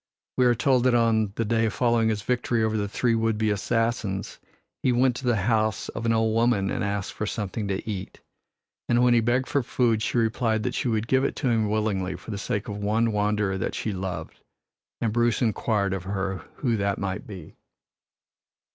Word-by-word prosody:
We 125 -1 +4
are 120 - +4
told 125 +3 +2
that 125 -1 +4
on 110 -3 +2
the 115 - -1
day 115 +1 +2
following 115 -1 +2
his 105 -2 -2
victory 120 -1 0
over 110 0 0
the 105 -1 0
three 120 +3 +1
would 115 -1 +1
be 110 0 +1
assassins 110 -1 -1 0.4
he 130 - +2
went 125 0 +3
to 130 - -7
the 120 -2 +3
house 110 +1 0
of 115 - -4
an - - +3
old 110 -1 +2
woman 115 -4 +2
and - - -2
asked 100 -1 -2
for 105 - -3
something 105 0 -3
to 100 +2 -3
eat. 95 -3 -5 0.7
And 120 +1 +4
when 125 -1 +5
he 120 - +5
begged 120 +3 +1
for 140 - +1
food 115 -2 +1
she 115 - -1
replied 115 -1 +1
that 125 - -1
she - - -1
would 110 -1 0
give 130 +1 +3
it - - -1
to 130 - -1
him 110 -3 +1
willingly 105 -4 -1
for - - -9
the 100 - -4
sake 105 +2 -3
of 105 -2 -4
one 110 +3 +1
wanderer 105 -2 0
that - - -2
she 110 - -2
loved; 90 -4 -5 0.6
and 110 -2 0
Bruce 120 -1 +2
inquired 105 -3 0
of 95 -2 -4
her 95 0 -2 0.2
who 120 -5 0
that 100 -1 0
might 100 +6 -4
be. 95 -7 -9
110 Hz, 210 wpm, -25 LUFS, 100-120 Hz, 0.7 s, when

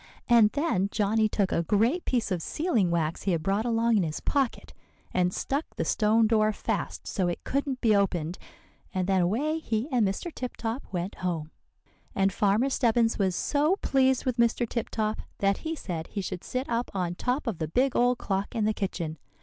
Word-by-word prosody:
And 235 -3 +6
then 285 - +1
Johnny 215 +1 +2
took 200 -3 0
a - - +2
great 225 - +1
piece 240 -5 0
of 180 -3 0
sealing 240 - 0
wax 165 -1 -1
he 190 - 0
had 160 -2 -1
brought 200 +5 0
along 230 -1 +2
in - - +3
his 155 -2 -3
pocket, 275 -4 -1 0.4
and 180 -1 +2
stuck 280 - -3
the 165 - -2
stone 220 +5 +3
door 215 -1 +3
fast - - -3
so 185 -4 -1
it 175 - -3
couldn't 275 -1 -2
be 220 -3 +4
opened. 180 -4 0 0.6
And 185 -1 +1
then 190 -2 +3
away 275 - 0
he 230 -4 -2
and 245 -3 +3
Mr. 250 - -4
Tip 250 -1 -5
Top 230 +4 -3
went 180 +1 -3
home. 165 -4 -2 0.6
"And 195 0 +2
Farmer 210 +7 +2
Stebbins 230 -3 +2
was 190 -3 +1
so 300 - +2
pleased 265 -1 +2
with 255 -2 0
Mr. 235 0 +2
Tip 235 0 -3
Top 215 -1 -1 0.2
that 195 0 +2
he 325 0 -3
said 170 - -5
he 200 - -4
should 180 -1 -5
sit 255 +2 -3
up 235 +1 -1
on 180 -2 -1
top 250 +9 -1
of 225 -9 -3
the 160 - -1
big 255 - +1
old 245 0 +3
clock 195 -1 -2
in 220 -2 +1
the 215 - +2
kitchen. 170 -6 -3
215 Hz, 200 wpm, -27 LUFS, 185-245 Hz, 0.6 s, And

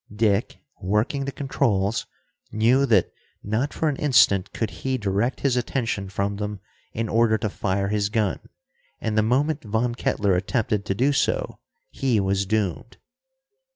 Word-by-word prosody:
Dick, 105 +1 +1 0.2
working 105 +9 0
the 140 - -3
controls, 115 -8 0 0.4
knew 125 +6 +3
that 110 -7 +3 0.3
not 110 +8 -1
for 160 - -1
an 145 -3 0
instant 105 -9 +4
could 110 -2 -3
he 130 -1 0
direct 105 +3 -1
his 135 -3 +2
attention 115 -5 -2
from 100 +1 -2
them 105 -1 -4 0.3
in 115 0 -2
order 115 0 +3
to 110 -2 -3
fire 100 0 -1
his 105 -1 0
gun, 105 -4 0 0.6
and 110 -1 -2
the 110 - +4
moment 140 +7 +1
Von 115 +2 0
Kettler 100 -4 0
attempted 105 +2 -1
to 95 - -1
do 135 +7 +2
so, - - 0 0.3
he 125 -5 +1
was 100 0 0
doomed. 110 +1 -2
110 Hz, 155 wpm, -24 LUFS, 100-125 Hz, 0.6 s, instant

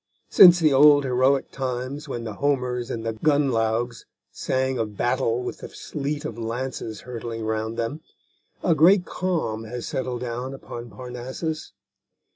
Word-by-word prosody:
Since 175 -2 +8
the 155 -4 +4
old 145 +1 +7
heroic 130 +1 +2
times 130 +3 -4
when 120 -3 -4
the 110 -2 -5
Homers 125 -1 -1
and 115 -1 -4
the 115 - -1
Gunnlaugs 120 -3 0 0.3
sang 130 -1 -1
of 105 -3 -3
battle 125 -1 0
with 125 - -5
the - - -8
sleet 150 0 -4
of 115 -6 -5
lances 115 -1 -4
hurtling 115 -2 -6
around 110 +1 -2
them, 115 +7 -3 0.6
a 175 - +4
great 175 +5 +5
calm 160 -12 -2
has 120 +1 -6
settled 125 -2 -3
down 125 +2 -4
upon 120 -3 -8
Parnassus. 125 - -6
125 Hz, 145 wpm, -24 LUFS, 115-145 Hz, 0.6 s, Since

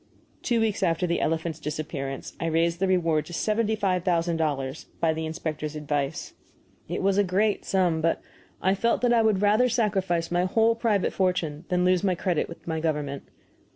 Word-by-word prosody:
Two 235 -2 +1
weeks 220 -2 0
after 175 -1 +1
the 170 -1 0
elephant's 160 0 -1
disappearance 150 -3 -5
I 165 - -1
raised 165 +1 +1
the 195 - +1
reward 165 -4 +1
to 175 - -9
seventy 220 +4 0
five 185 -4 0
thousand 170 -2 +1
dollars 145 -3 -2
by 165 -1 +2
the 160 0 -3
inspector's 155 -2 -4
advice. 145 -2 -3 0.6
It - - -2
was 195 +1 +3
a - - +5
great 200 +3 +1
sum, 180 -4 +1
but 165 +1 +1 0.4
I 190 - +4
felt 230 +4 +1
that 245 -1 +3
I 230 - +5
would 210 -3 +2
rather 215 +5 +4
sacrifice 190 -8 0
my 175 +1 +2
whole 225 +4 +3
private 225 -4 0
fortune 175 -4 -1
than 180 0 +2
lose 185 0 +3
my 185 -2 +2
credit 175 -2 -1
with 170 - -12
my 160 -1 -1
government. 150 -3 -2
175 Hz, 190 wpm, -26 LUFS, 160-195 Hz, 0.6 s, a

